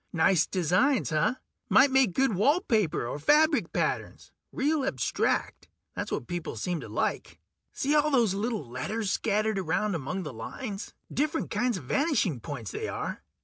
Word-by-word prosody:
Nice 170 0 +3
designs, 185 - +2
huh? 165 +11 +2 0.3
Might 270 +1 +6
make 260 -8 +4
good 270 +1 +2
wall 275 - +3
paper 215 - +1
or 125 - -4
fabric 300 - +3
patterns. - - -2 0.2
Real 295 +1 0
abstract... 270 - -1 0.3
that's - - -4
what - - -2
people 175 -2 -4
seem 175 -3 -2
to - - -9
like. - - -2 0.3
See 285 +2 -1
all 300 0 +4
those 235 -9 +3
little 210 - -2
letters 190 - -3
scattered 215 -1 0
around 190 +4 0
among 165 +4 -3
the 150 -5 -6
lines? 195 - -6 0.2
Different 305 +3 -1
kinds 245 -4 0
of 170 - -8
vanishing 225 - +1
points, 115 -4 -6
they - - -4
are. - - -4
210 Hz, 160 wpm, -28 LUFS, 165-265 Hz, 0.3 s, Might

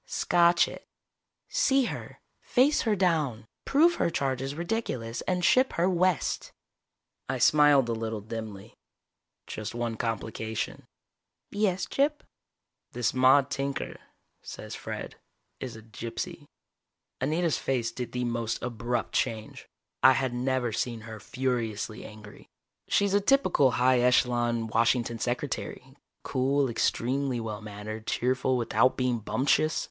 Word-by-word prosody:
"Scotch 170 0 +3
it. - - -10 0.6
See 275 - +3
her, - - -6 0.2
face 270 +4 +3
her 210 - +3
down, 155 - 0 0.2
prove 330 +5 +4
her - - +3
charge 135 -5 -1
is 135 +1 -4
ridiculous, 165 - -3
and 180 -1 +1
ship 255 +6 +4
her 170 +2 +2
west." 185 -3 0 0.8
I - - 0
smiled 145 -4 +5
a 115 - 0
little 110 -1 -3
dimly. 110 -2 -7 0.7
"Just 110 +1 -6
one 120 -1 -2
complication." 110 -1 -4 0.6
"Yes, 200 -3 0
Gyp?" 295 +2 0 0.7
"This 120 -1 0
Maude 130 +2 +5
Tinker, 135 0 -3 0.4
says - - -8
Fred, - - -6 0.4
is 130 -3 -6
a 110 - -11
gypsy." 115 +1 -6 0.7
Anita's 160 +4 +1
face 120 -4 -1
did 120 0 -5
the 125 0 -2
most 115 -2 -2
abrupt 120 -1 -2
change. 110 -1 -2 0.3
I 130 - +8
had 130 -1 -1
never 125 -1 0
seen 115 +1 -2
her 110 0 -9
furiously 115 -5 -3
angry. 105 -1 -12 0.4
She's 200 -1 +2
a 205 - +4
typical 195 - +4
high 125 0 +4
echelon 120 -2 +2
Washington 115 +1 +1
secretary, 130 +1 -4 0.3
cool, 135 0 +1
extremely 130 +2 0
well 110 -2 -5
mannered, 110 +1 -7
cheerful 130 +1 +1
without 125 +2 +2
being 125 -2 0
bumptious. 140 +7 +1
125 Hz, 125 wpm, -28 LUFS, 115-150 Hz, 0.8 s, I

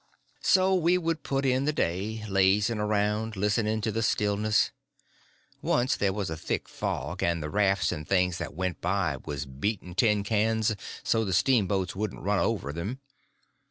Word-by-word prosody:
So 190 0 +4
we 180 0 +3
would 165 -3 -1
put 135 0 -1
in 130 +1 +2
the 150 - +2
day, 105 - -2
lazying 100 +3 +2
around, 105 +1 0
listening 105 +2 0
to 110 +1 -1
the 115 - -1
stillness. 105 -1 +1 0.9
Once 125 +3 +2
there 100 -2 +1
was 100 -4 -3
a - - -2
thick 80 - -3
fog, - - -4
and 85 -2 0
the 75 - -4
rafts 100 -2 +2
and 75 -4 -5
things 90 -2 +2
that 75 -4 -5
went 95 +1 -3
by 90 -5 0
was 75 -1 -4
beating 90 +8 -3
tin 105 +1 +2
pans 110 +1 +1 0.3
so 115 -1 +2
the 95 -3 -2
steamboats 100 -6 +2
wouldn't 105 +2 -4
run 100 0 +1
over 100 -11 -1
them. 100 - -4
105 Hz, 165 wpm, -28 LUFS, 95-110 Hz, 0.9 s, So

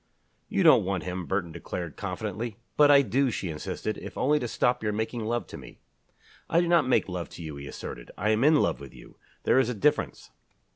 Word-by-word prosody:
"You - - +1
don't - - +7
want 95 -3 -2
him," 90 +1 -4
Burton 95 -3 -1
declared, 85 -1 -6
confidently. 115 -1 -4 0.2
"But 145 -1 +6
I 140 -1 +7
do," 130 +4 +1
she 95 -5 -3
insisted, 100 +7 -4
"if - - -9
only 150 +3 +2
to 120 - -3
stop 125 +2 +1
your 110 -1 0
making 110 +2 -3
love 120 +2 -1
to - - -8
me." - - -13 0.7
"I 170 - +4
do 175 - +1
not 170 -6 +4
make 130 - +2
love 90 -2 -5
to 85 - -10
you," 75 -2 -6
he 70 0 -8
asserted. - - -8
"I 105 +3 +1
am 110 +3 +2
in 155 +2 +6
love 140 - +2
with 70 -1 -11
you. - - -15 0.3
There - - +4
is 130 -2 +2
a 125 - -2
difference." 145 +9 0
110 Hz, 225 wpm, -27 LUFS, 90-130 Hz, 0.7 s, don't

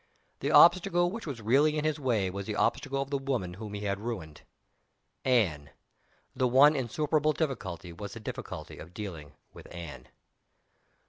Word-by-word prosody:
The - - -1
obstacle 175 0 +6
which 225 -3 -6
was 125 -6 -6
really 145 +7 +3
in 150 - -1
his 155 -1 0
way 110 -9 0
was 100 +1 -6
the 105 - -2
obstacle 135 +5 0
of 140 - -14
the 140 - 0
woman 125 -10 -2
whom 105 +2 -7
he 100 - -5
had 100 -1 -2
ruined. 100 -10 -6 0.8
Anne! 95 - +1 0.7
The 130 - +2
one 140 +5 +6
insuperable 150 +4 +1
difficulty 95 - -3
was 100 +3 -7
the 115 - -8
difficulty 110 - -7
of 85 +2 -12
dealing 85 -9 -7 0.2
with - - -12
Anne. 75 -7 -8
115 Hz, 160 wpm, -29 LUFS, 95-145 Hz, 0.8 s, obstacle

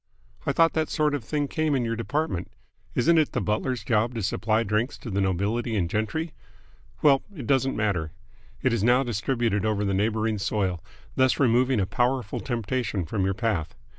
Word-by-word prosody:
"I - - +3
thought 165 0 +4
that 160 -1 0
sort 150 -2 +1
of 145 -5 -2
thing 145 +5 -1
came 155 0 0
in 125 -3 0
your 115 0 -1
department. 115 - -2 0.5
Isn't 165 0 +4
it 155 - +1
the - - +1
butler's 110 +2 -1
job 115 +2 +1
to 115 - -2
supply 110 +3 +1
drinks 110 +4 -1
to 115 - -8
the 100 +1 0
nobility 105 +5 0
and 90 -5 +1
gentry? 110 - -2 0.7
Well, 140 -2 +6
it 150 - -6
doesn't 135 -1 +2
matter. 90 -8 -1 0.5
It 130 - +3
is 115 -4 0
now 125 +3 +4
distributed 115 -2 0
over 105 -1 0
the 100 - 0
neighbouring 110 +2 0
soil, 95 -4 -1 0.3
thus 130 -1 +3
removing 125 -1 +3
a 95 - +2
powerful 120 +2 0
temptation 120 -5 -2
from 95 +2 -1
your 95 0 0
path. 100 -8 -1
115 Hz, 185 wpm, -26 LUFS, 105-130 Hz, 0.7 s, Well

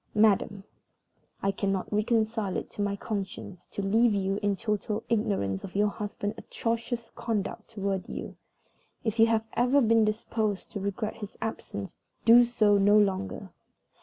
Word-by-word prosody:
"MADAM 205 -2 +3 0.8
I 195 - +3
cannot 195 0 -2
reconcile 220 -2 +1
it - - -5
to - - -5
my 200 0 0
conscience 195 -3 -5
to 200 - -5
leave 220 +3 +3
you 195 0 0
in 205 -1 +1
total 210 +2 -2
ignorance 195 - 0
of 185 - -8
your 205 +1 +3
husband's 205 0 -4
atrocious 230 +1 -3
conduct 215 -4 -3
toward 200 -3 -3
you. - - -6 0.7
If 220 0 -2
you 225 - +7
have 225 -1 +1
ever 250 +4 +3
been 230 -3 +4
disposed 215 -1 -1
to 205 - -4
regret 200 +3 -3
his 210 -2 -8
absence 160 - -5 0.3
do 235 +1 +9
so 215 -4 +3
no 205 +2 +5
longer. 190 - 0
210 Hz, 150 wpm, -28 LUFS, 200-225 Hz, 0.8 s, do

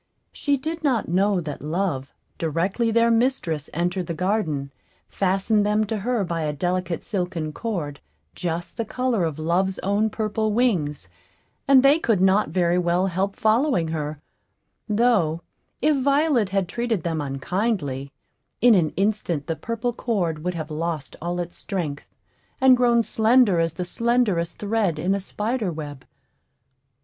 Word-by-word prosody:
She 285 -1 0
did 320 +4 -5
not 250 - +1
know 195 +2 +2
that 150 -3 -6
Love, 155 -4 -2 0.3
directly 180 +8 0
their 230 +1 +3
mistress 225 - 0
entered 175 +2 -1
the 170 - -3
garden, 160 -7 -1 0.4
fastened 195 +3 +1
them 210 +1 +2
to 215 +1 -2
her 230 +1 0
by 170 -2 -2
a 150 -1 -1
delicate 175 +2 -2
silken 180 -7 -3
cord, 165 -9 -4 0.3
just 170 0 -4
the 230 - 0
color 245 -3 -1
of 160 -3 -3
Love's 180 +4 0
own 205 +3 +1
purple 215 0 -1
wings, 170 - 0 0.6
and 270 -2 +7
they 280 +4 +6
could 225 - +1
not 190 0 +3
very 175 +1 +2
well 175 +1 +1
help 195 +2 -1
following 220 - +2
her; 150 -2 -3 0.7
though, 205 -8 +2 0.4
if 305 0 +4
Violet 275 -5 +2
had 195 -2 0
treated 235 -6 -2
them 165 -3 -1
unkindly, 140 - -2 0.5
in 245 -1 +6
an 170 -6 +2
instant 195 -7 0
the 165 - -2
purple 230 +5 -3
cord 175 -11 -2
would 180 0 -2
have 155 -1 -5
lost 155 -3 -3
all 175 +2 -2
its 175 0 -5
strength, 165 -8 -4 0.5
and 260 -1 +7
grown 240 -1 +3
slender 220 -4 +4
as 165 -1 +1
the 180 +1 -4
slenderest 210 -5 0
thread 205 -6 0
in 180 +5 0
a 200 - 0
spider 210 +1 -2
web. 145 -4 -7
190 Hz, 150 wpm, -24 LUFS, 165-225 Hz, 0.7 s, and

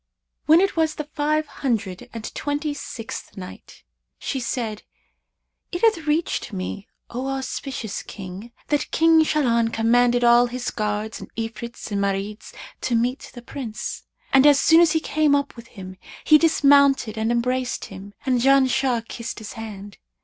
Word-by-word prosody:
When 320 +3 +7
it 390 - +1
was 320 -2 +1
the 300 - -4
Five 305 +1 -1
Hundred 225 -10 -3
and 225 -1 -7
Twenty 290 0 -2
sixth 230 -6 -8
Night, 185 -1 -11 0.3
She 270 - -3
said, 230 -3 -3 0.9
It 350 - -4
hath 385 -9 +3
reached 300 -4 0
me, 195 +1 -5 0.2
O 255 +3 -3
auspicious 265 -4 -4
King, 195 +4 -9 0.2
that 295 -1 0
"King 325 0 +5
Shahlan 235 -7 +1
commanded 240 +2 +3
all 240 +1 +6
his 245 0 -4
guards 210 0 -3
and - - -10
Ifrits 230 0 -6
and 200 -1 0
Marids 200 +2 -3 0.3
to 245 - 0
meet 245 +3 -1
the 240 - -9
Prince; 240 -4 -6 0.3
and, 270 +2 +7
as 285 -1 +6
soon 325 +1 +6
as 335 -2 +4
he 320 - +2
came 310 -2 +2
up 280 0 -1
with 235 -1 -12
him, 185 -4 -10 0.3
he 305 -1 +6
dismounted 280 -6 +4
and 220 +1 0
embraced 250 +1 -1
him, 195 +1 -11
and 255 -2 +2
Janshah 260 -3 +3
kissed 235 +1 -6
his 220 -1 -8
hand. 205 -3 -9
245 Hz, 155 wpm, -23 LUFS, 220-290 Hz, 0.9 s, When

